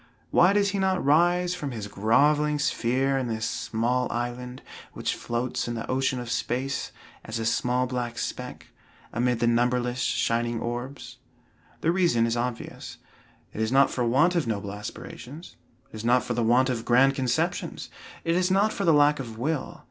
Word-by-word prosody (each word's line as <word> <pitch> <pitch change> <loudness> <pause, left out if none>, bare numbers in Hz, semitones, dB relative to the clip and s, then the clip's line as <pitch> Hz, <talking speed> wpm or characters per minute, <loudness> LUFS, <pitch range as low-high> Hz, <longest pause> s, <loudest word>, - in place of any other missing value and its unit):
Why 180 +2 +5
does 200 0 +2
he 200 - -2
not 190 -3 +1
rise 175 +4 +3
from 150 -6 -4
his 110 -5 -5
groveling 145 +9 +2
sphere 135 -1 +1
in 130 - -2
this 110 -1 -2
small 120 +3 -1
island, 125 +2 -4 0.3
which - - -2
floats 120 +1 -3
in 120 - -3
the 115 - -4
ocean 130 0 0
of 120 -1 -6
space, 135 +3 -2 0.3
as 110 +1 -5
a 115 - -3
small 125 +2 +1
black 120 -2 -3
speck, - - -5 0.4
amid 120 +1 +1
the - - +3
numberless 125 +1 +1
shining 120 -1 0
orbs? 120 +4 -5 0.6
The 165 - +2
reason 170 -11 +2
is 115 0 0
obvious; 120 0 -4 0.6
it 110 - -4
is 110 +1 0
not 135 +1 +5
for 125 - -3
the 120 - +2
want 155 +9 +4
of 165 -8 +1
noble 100 -2 -3
aspirations; 125 - -9 0.4
it - - -8
is 110 - -7
not 120 +1 +3
for 120 - -3
the 120 - -1
want 125 +3 +3
of 115 -2 -3
grand 125 +3 +4
conceptions; 130 -3 -2 0.3
it 165 - +1
is 180 +1 +2
not 200 +3 +3
for 200 - -2
the 165 - +5
lack 145 0 +4
of 115 -4 -7
will. 145 +4 -3
125 Hz, 180 wpm, -26 LUFS, 120-145 Hz, 0.6 s, Why